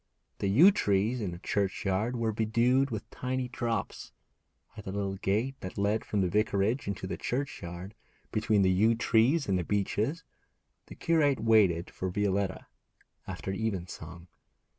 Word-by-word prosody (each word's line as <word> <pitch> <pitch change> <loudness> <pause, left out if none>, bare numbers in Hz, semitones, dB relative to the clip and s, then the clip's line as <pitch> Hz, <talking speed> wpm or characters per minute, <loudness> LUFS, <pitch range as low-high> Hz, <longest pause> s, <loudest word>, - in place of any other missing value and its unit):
The 100 - 0
yew 155 - +7
trees 110 - +1
in 100 - -2
the 85 - -6
churchyard 100 +4 -1
were 115 -2 0
bedewed 115 +5 +2
with 110 -4 -5
tiny 130 0 -2
drops. 120 -2 -3 0.6
At 105 - -10
the 95 - -4
little 100 -1 -2
gate 110 +8 -1
that 90 - -7
led 105 +2 0
from 105 - 0
the 95 - +2
vicarage 105 +5 +1
into 100 -1 -3
the 95 - -4
churchyard, 95 -8 -4 0.4
between 110 -2 +2
the 95 - +4
yew 110 +5 +3
trees 120 +7 +2
and 95 -2 +1
the - - -1
beeches, 105 - -1 0.6
the - - -10
curate 150 -5 +2
waited 100 -7 +3
for 95 - -4
Violetta, 100 0 -1 0.6
after 95 - -5
evensong. 90 -5 -4
105 Hz, 150 wpm, -29 LUFS, 95-120 Hz, 0.6 s, yew